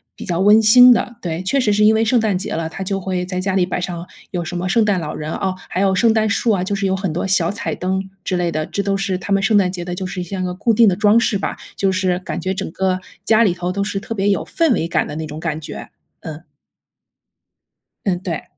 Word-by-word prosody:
比 - - -9
较 175 -3 -2
温 210 +3 +6
馨 250 +3 +8
的， 240 +1 -2
对， 170 -1 -3
确 195 +9 +1
实 225 -5 +2
是 210 - +2
因 220 +1 +5
为 220 - +2
圣 245 +1 +3
诞 215 -4 +1
节 210 +3 -5
了， 165 -3 -2
他 180 +4 -6
就 195 +1 -2
会 180 -1 -3
在 185 0 -4
家 190 0 -1
里 185 - +3
摆 180 0 -3
上 175 -1 -5 0.3
有 175 -2 -2
什 175 +2 -5
么 180 +1 -2
圣 230 +3 +3
诞 200 -3 +1
老 155 -2 -5
人， 155 +1 -5
哦， 190 -2 -2
还 185 - -3
有 195 -1 +2
圣 225 +3 +3
诞 220 -1 +1
树 225 +3 +1
啊， 190 -4 +1
就 200 +2 -2
是 200 0 -2
有 190 0 +1
很 190 -3 -2
多 175 - -2
小 190 -3 +2
彩 210 - -3
灯 190 +1 -2
之 180 - -1
类 175 -1 0
的， 155 -1 -2
这 200 - -3
都 200 0 0
是 195 -1 -1
他 200 - -3
们 195 - +2
圣 215 +1 +3
诞 185 -3 +2
节 180 -2 -5
的 175 0 -5
就 185 +1 -4
是 180 0 -4
像 185 +1 -4
个 180 - -2
固 210 +6 0
定 225 0 +5
的 185 - +3
装 210 +3 +4
饰 215 -3 +1
吧， - - -3 0.2
就 195 -1 +1
是 185 -1 0
感 185 - -5
觉 190 0 -2
整 190 - -4
个 185 +1 -1 0.3
家 225 +1 +4
里 195 - +2
头 180 0 -3
都 200 +2 -1
是 200 0 -3
特 225 - -6
别 205 -1 0
有 200 - 0
氛 330 -4 +1
围 165 - -1
感 - - 0
的 150 - -7
那 160 0 -4
种 155 0 -7
感 160 -2 -3
觉。 155 - -8 0.3
嗯。 160 +1 -8 1.6
嗯， 185 -3 0
对。 175 -4 -4
190 Hz, 295 characters per minute, -19 LUFS, 180-205 Hz, 1.6 s, 馨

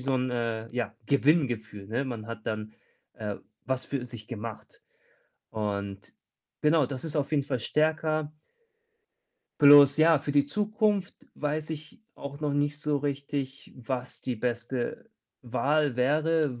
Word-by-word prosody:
so 130 +1 0
'n, 130 0 0
äh, 115 -2 -2
ja, 125 0 -3
Gewinngefühl, 125 - +1
ne? 120 +6 -1
Man 115 -5 -5
hat 115 -2 -8
dann, 110 0 -3 0.4
äh, 105 -2 -4 0.3
was 130 0 -1
für 135 -3 -3
sich 120 -3 -9
gemacht. 115 -1 -7 0.7
Und 100 -2 -4 0.5
genau, 150 -2 +4
das 130 +2 -6
ist 160 -1 -4
auf 145 -2 0
jeden 145 -2 +3
Fall 135 -3 -1
stärker. 155 +2 +1 1.3
Bloß 145 0 +9
ja, 160 0 +6
für 145 0 -3
die 145 0 +4
Zukunft 210 +1 0 0.2
weiß 150 +1 -2
ich 155 +3 -7
auch 140 +1 -8
noch 150 -2 0
nicht 145 +1 0
so 150 -1 +1
richtig, 140 -1 -4
was 125 0 -4
die 125 - -2
beste 120 +2 -3 0.3
Wahl 140 +3 +1
wäre, 150 0 +2
140 Hz, 140 wpm, -28 LUFS, 120-150 Hz, 1.3 s, Bloß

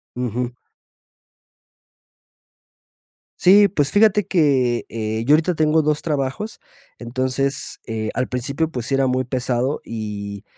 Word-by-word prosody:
Ujú. 125 0 -3 2.8
Sí, 200 +3 +7
pues 150 -7 0
fíjate 210 -1 +4
que, 135 -9 +2
eh, 110 0 -3
yo 145 - +6
ahorita 165 +3 +1
tengo 155 0 +2
2 150 0 0
trabajos, 150 +8 -3 0.4
entonces, 130 +3 -2
eh, 110 -1 -3
al 130 - 0
principio, 140 +6 -2
pues, 125 -5 -5
sí 135 - +1
era 135 0 +2
muy 130 0 0
pesado, 125 +2 -1
y 105 -3 -6
130 Hz, 120 wpm, -21 LUFS, 120-155 Hz, 2.8 s, Sí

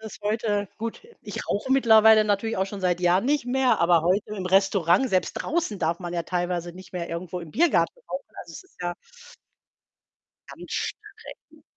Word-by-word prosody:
Ist 220 -1 -10
heute 210 -1 -1
Gut, 230 0 -5 0.2
ich - - -7
rauche 260 +6 -1
mittlerweile 220 -4 +6
natürlich 210 +1 0
auch 190 - 0
schon 195 0 -7
seit 180 -1 0
Jahren 180 +3 +3
nicht 280 -1 0
mehr, 255 0 +2
aber 170 -1 +4
heute 195 +5 0
im 185 -2 -4
Restaurant, 195 +3 +3
selbst 185 -1 +1
draußen 320 -11 -2
darf 165 +1 0
man 175 -2 -6
ja 170 - -1
teilweise 175 0 -3
nicht 185 +1 -13
mehr 175 -2 -4
irgendwo 175 +1 -5
im 165 -2 -10
Biergarten 345 - +2
rauchen. - - -4 0.2
Also, - - -11
es - - -9
ist 375 - -24
ja 175 0 -2 1.5
ganz - - -11
streng. 425 +1 -7
195 Hz, 180 wpm, -25 LUFS, 175-230 Hz, 1.5 s, mittlerweile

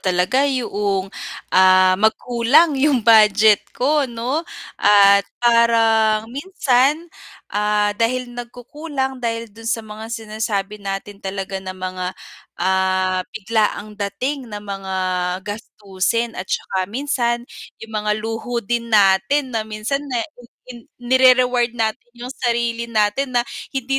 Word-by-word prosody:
talaga 185 +10 +1
yaong, 205 -7 -2 0.4
ah, 185 0 +6
magkulang 240 +8 +3
yung 270 -6 +2
budget 215 -2 +6 0.2
ko, 285 +1 +1
'no, 240 +6 -2 0.4
at 200 -1 +6 0.2
parang 225 -2 +3
minsan, 285 -1 +1 0.5
ah, 210 0 +1
dahil 245 +3 -1
nagkukulang 265 +3 -5
dahil 230 -2 -3
dun 225 +1 -8
sa 225 -1 -1
mga 215 +1 -9
sinasabi 215 -2 -4
natin 195 0 -6
talaga 195 0 -5
na 185 0 -7
mga, 185 0 -4 0.5
ah, 185 0 +1
biglaang 215 0 -2
dating 255 +6 -3
ng 210 -1 -7
mga 195 -1 -5 0.5
gastusin, 210 +1 -3
at 185 -2 -7
'tsaka 185 -1 -2
minsan 240 -1 -1 0.3
yung 225 0 -12
mga 210 0 -1
luho 225 +2 -4
din 235 +2 -2
natin 215 +6 +3
na 225 - 0
minsan 215 +6 -2
na 255 - -2
i 245 -6 -16 0.3
in 240 -2 -11 0.2
nire-reward 250 -1 +4
natin 220 0 -1 0.2
yung 245 +1 -8
sarili 235 -2 -1
natin 230 +4 0
na 240 - +3 0.3
hindi 270 +1 -1
225 Hz, 125 wpm, -20 LUFS, 205-245 Hz, 0.5 s, ah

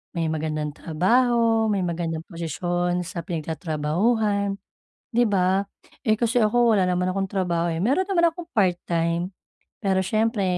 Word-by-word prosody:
may 165 -1 0
magandang 155 -1 -2
trabaho, 225 +7 +2
may 200 -3 +1
magandang 165 -1 -3
posisyon 175 +1 -2
sa 170 -1 -5
pinagtatrabahuhan, 180 +6 -1 0.6
di 240 +1 +4
ba? 190 0 +2 0.4
Eh, 215 - +4
kasi 235 +2 +1
ako, 235 +2 +4
wala 185 -2 +2
naman 180 +1 0
akong 195 0 -2
trabaho 175 -3 0
eh, 165 - -2
meron 285 - +1
naman 340 -4 +3
akong 345 0 -9
part 180 -4 +3
time 170 +1 0 0.5
pero 190 -3 +1
siyempre, 220 +1 0
185 Hz, 140 wpm, -24 LUFS, 170-220 Hz, 0.6 s, di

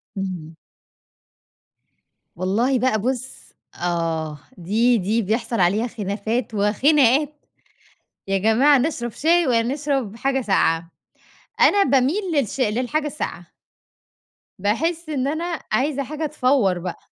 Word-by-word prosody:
امم. 180 -5 -5 1.8
والله 225 +9 +1
بقى 240 -3 +1
بُص 260 +2 -4 0.3
آه، 165 -3 -2 0.2
دي 225 +7 +2
دي 215 +4 0
بيحصل 225 +3 -2
عليها 200 +6 +2
خلافات 220 +1 -3
وخناقات، 270 +7 +2 0.8
يا 195 0 +1
جماعة 245 +8 +4
نشرّب 245 -4 -2
شاي 335 +6 +2
والّا 240 +1 +1
نشرّب 275 -7 -2
حاجة 270 +2 0
ساقعة؟ 170 -7 +1 0.7
أنا 405 -1 +5
باميل 275 +9 +2
للش 275 -2 -1
للحاجة 255 +7 0
الساقعة. 300 - -5 1.1
باحس 320 - -1
إن 275 -3 -1
أنا 330 +2 -2
عايزة 280 +1 0
حاجة 305 +4 -4
تفوّر 250 -10 +1
بقى. 180 0 -5
240 Hz, 110 wpm, -22 LUFS, 200-280 Hz, 1.8 s, أنا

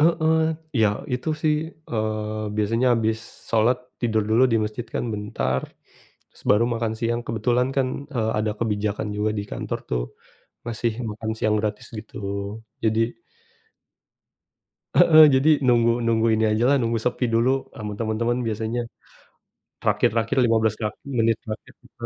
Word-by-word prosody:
Heeh. 160 0 +3 0.4
Iya 110 -2 +5 0.3
itu, 130 +5 -4
sih, 155 -1 +3 0.4
eee, 110 -1 -2
biasanya 115 +4 +1
habis 110 -1 0 0.3
salat, 115 +3 +3 0.2
tidur 110 -2 +1
dulu 115 +4 +4
di 115 - +4
masjid 110 +3 -5
kan - - -1
bentar, 65 -11 -2 0.7
terus - - -18
baru 105 +3 +5
makan 115 -1 -1
siang 120 0 0
kebetulan 120 +3 +1
kan, 135 -1 +2 0.3
eee, 110 -3 +1
ada 105 0 0
kebijakan 105 -1 -1
juga 105 +1 +1
di 100 - -1
kantor, - - -3
tuh, - - 0 0.6
ngasih 115 0 -1 0.2
makan 110 +1 -4
siang 105 -1 +2
gratis 105 0 -3
gitu. - - -11 0.7
Jadi 110 0 +2 2.0
Heeh, 155 -1 +8
jadi, 135 +4 +4 0.2
nunggu 115 -1 +4
nunggu 115 0 +2
ini 110 0 +2
ajalah 120 +6 +3
nunggu 115 0 0
sepi 125 +1 0
dulu, 115 +2 +3 0.3
sama 105 -2 -5
temen-temen 115 +2 0
biasanya. 110 +2 -2 1.0
Terakhir, - - +3
terakhir 115 +4 0
15 110 -2 +2
terak 105 -2 -2 0.2
menit 115 0 +3
terakhir 110 -1 -7
kita. - - -10
115 Hz, 140 wpm, -24 LUFS, 110-120 Hz, 2.0 s, Heeh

